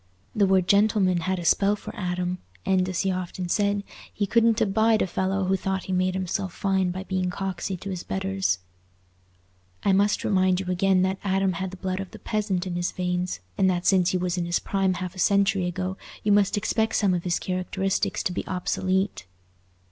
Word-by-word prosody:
The 200 -2 +4
word 190 -2 +3
"gentleman" 200 -3 +3
had 185 +3 -1
a 175 - -5
spell 200 +4 +3
for - - -9
Adam, 180 -1 -2 0.3
and, 185 -1 +2
as 185 - -1
he 195 - +1
often 180 0 -4
said, 200 +1 +1 0.3
he 205 - -1
"couldn't 230 +2 +3
abide 220 +1 +3
a - - +1
fellow 190 +1 -1
who 190 +1 +2
thought 190 0 -2
he 190 - -4
made 185 0 +1
himself 190 0 -2
fine 190 -2 +1
by 185 +2 -4
being 185 -1 -1
coxy 190 0 -3
to's 185 -2 -5
betters." 190 - -1 1.3
I 200 - +3
must 200 +1 +2
remind 185 -2 +2
you 190 - -4
again 185 0 +3
that 190 +1 0
Adam 195 -1 +1
had 185 +2 -3
the 190 - -10
blood 185 0 -3
of 195 -1 -5
the - - -11
peasant 205 -4 -1
in 175 -2 -3
his 175 0 -1
veins, 180 - -2 0.2
and 190 - +4
that 175 -1 -1
since 185 -2 +4
he 185 - +1
was 180 0 -1
in 175 - -1
his 175 0 +1
prime 195 -2 0
half 185 -1 -5
a 185 - -10
century 200 -1 +3
ago, 185 +1 -3 0.3
you 210 - +2
must 205 0 +3
expect 220 +2 0
some 200 -3 +3
of 175 -1 -1
his 175 -1 0
characteristics 190 +1 -1
to - - 0
be - - -2
obsolete. 185 - -1
190 Hz, 200 wpm, -25 LUFS, 180-195 Hz, 1.3 s, The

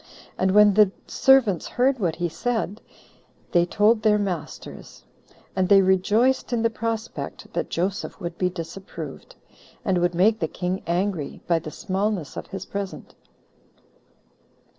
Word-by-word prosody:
And 190 - +1
when 205 +1 +6
the 210 -1 +6 0.2
servants 250 -10 +3
heard 255 +1 +1
what 170 -6 0
he 175 +1 -1
said, 220 +2 -2 0.7
they 175 -1 +3
told 215 +4 +3
their 210 -1 +4
masters; 180 -7 -6 0.5
and 185 -1 +1
they 195 -1 +7
rejoiced 210 +9 +2
in 235 -2 0
the 230 - +2
prospect 225 0 -5
that - - -2
Joseph 190 +4 -2
would 170 -3 -5
be 180 0 0
disapproved, 180 - -8 0.5
and 185 -2 +2
would 175 0 +1
make 215 +5 +3
the 160 - 0
king 180 +3 -3
angry, 175 -3 -1
by 170 -1 +2
the 155 - -7
smallness 190 -1 -2
of - - -6
his 195 -1 -6
present. 200 -1 -6
195 Hz, 140 wpm, -24 LUFS, 175-215 Hz, 0.7 s, they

